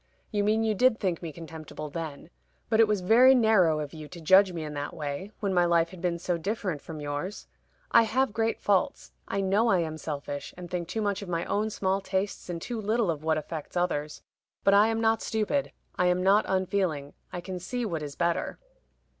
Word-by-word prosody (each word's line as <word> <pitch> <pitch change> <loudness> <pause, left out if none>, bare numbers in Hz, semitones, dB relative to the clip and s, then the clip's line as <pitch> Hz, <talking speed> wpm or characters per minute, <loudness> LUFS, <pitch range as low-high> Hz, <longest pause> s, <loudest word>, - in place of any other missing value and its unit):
"You 205 -2 +1
mean 215 +2 +2
you 220 -1 +2
did 240 +2 +3
think 185 -5 -1
me 165 -2 -5
contemptible 155 -2 -8
then. 160 0 -6 0.4
But 220 - +2
it 225 - +7
was 210 -3 0
very 245 +8 +7
narrow 205 -10 +4
of 150 0 -5
you 155 -2 -8
to 175 - -10
judge 190 +4 +6
me 165 -2 -5
in 150 -1 -6
that 145 +2 -4
way, 150 +5 -5
when 200 -2 0
my 175 -1 +4
life 170 -1 +3
had 185 -2 -11
been 175 -2 0
so 175 0 -2
different 185 -4 -2
from 160 -2 -8
yours. 145 +7 -4 0.5
I 230 - +7
have 230 +1 +1
great 225 0 0
faults. 195 -3 0 0.2
I 195 - -1
know 200 +4 +2
I 195 - +4
am 155 -1 -4
selfish, 145 -2 -5
and 175 -1 -9
think 175 -2 -2
too 220 +5 -2
much 205 -1 -1
of 200 - -7
my 170 0 -1
own 215 +2 0
small 195 -2 0
tastes 190 -1 -3
and 170 -1 -3
too 230 +6 -4
little 215 -2 +1
of 155 -2 -6
what 160 0 +2
affects 155 +2 -5
others. 150 -4 -1 0.4
But 200 - +5
I 205 +2 +6
am 225 0 0
not 225 0 +2
stupid. 220 +6 -1 0.3
I 180 - +4
am 180 0 +2
not 200 +3 +4
unfeeling. 185 -7 -1 0.2
I 180 - -4
can 180 +1 -6
see 245 +7 -3
what 165 -7 -3
is 145 -1 -6
better." 170 -1 -1
180 Hz, 220 wpm, -28 LUFS, 160-210 Hz, 0.5 s, it